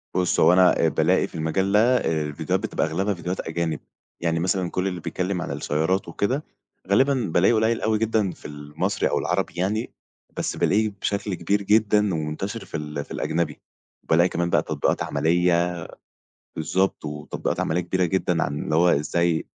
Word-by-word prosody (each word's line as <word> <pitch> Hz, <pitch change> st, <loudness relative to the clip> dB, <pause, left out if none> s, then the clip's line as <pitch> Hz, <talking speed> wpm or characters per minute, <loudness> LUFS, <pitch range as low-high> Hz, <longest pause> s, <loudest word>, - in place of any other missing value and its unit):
بُص 90 Hz, -2 st, +1 dB
هو 90 Hz, -, +6 dB
أنا 90 Hz, -1 st, +5 dB
آآ -, -, +4 dB
بالاقي -, -, +2 dB
في -, -, -15 dB
المجال 80 Hz, +5 st, 0 dB
ده 115 Hz, +5 st, +4 dB
آآ 80 Hz, -8 st, 0 dB
الفيديوهات 75 Hz, -1 st, -2 dB
بتبقى -, -, -1 dB
أغلبها 95 Hz, +6 st, -1 dB
فيديوهات 90 Hz, 0 st, -4 dB
أجانب، 80 Hz, 0 st, -2 dB, 0.4 s
يعني 85 Hz, -1 st, 0 dB
مثلًا 90 Hz, 0 st, 0 dB
كل 95 Hz, +1 st, -1 dB
اللي 90 Hz, -2 st, -3 dB
بيتكلم 90 Hz, +3 st, -2 dB
عن -, -, -4 dB
السيارات 80 Hz, +6 st, -1 dB
وكده 130 Hz, +9 st, -1 dB, 0.4 s
غالبًا 130 Hz, +8 st, +4 dB, 0.2 s
بالاقي 90 Hz, +6 st, +4 dB
قُليل 110 Hz, +1 st, +1 dB
أوي 110 Hz, -1 st, +1 dB
جدًا 110 Hz, -3 st, +1 dB
في -, -, -16 dB
المصري 75 Hz, 0 st, -2 dB
أو -, -, +1 dB
العربي -, -, -1 dB
يعني، 105 Hz, +6 st, -1 dB, 0.5 s
بس -, -, -2 dB
بالاقيه 110 Hz, +2 st, +2 dB
بشكل 100 Hz, -1 st, -1 dB
كبير 100 Hz, +4 st, 0 dB
جدًا، 105 Hz, -1 st, +3 dB
ومنتشر 80 Hz, +8 st, -4 dB
في 85 Hz, -, -5 dB
ال 75 Hz, -1 st, -5 dB
في -, -, -19 dB
الأجنبي. 80 Hz, -2 st, -2 dB, 0.4 s
وبالاقي 85 Hz, +2 st, +3 dB
كمان 85 Hz, 0 st, -1 dB
بقى -, -, +3 dB
تطبيقات -, -, 0 dB
عملية 85 Hz, +1 st, +2 dB, 0.8 s
بالضبط 95 Hz, +3 st, 0 dB
وتطبيقات 75 Hz, 0 st, -4 dB
عملية 85 Hz, +3 st, 0 dB
كبيرة 90 Hz, +1 st, 0 dB
جدًا 90 Hz, -1 st, +1 dB
عن 70 Hz, +1 st, -3 dB
اللي 75 Hz, -, -1 dB
هو 85 Hz, +2 st, +5 dB
إزاي 85 Hz, +3 st, +1 dB
90 Hz, 170 wpm, -24 LUFS, 80-100 Hz, 0.8 s, هو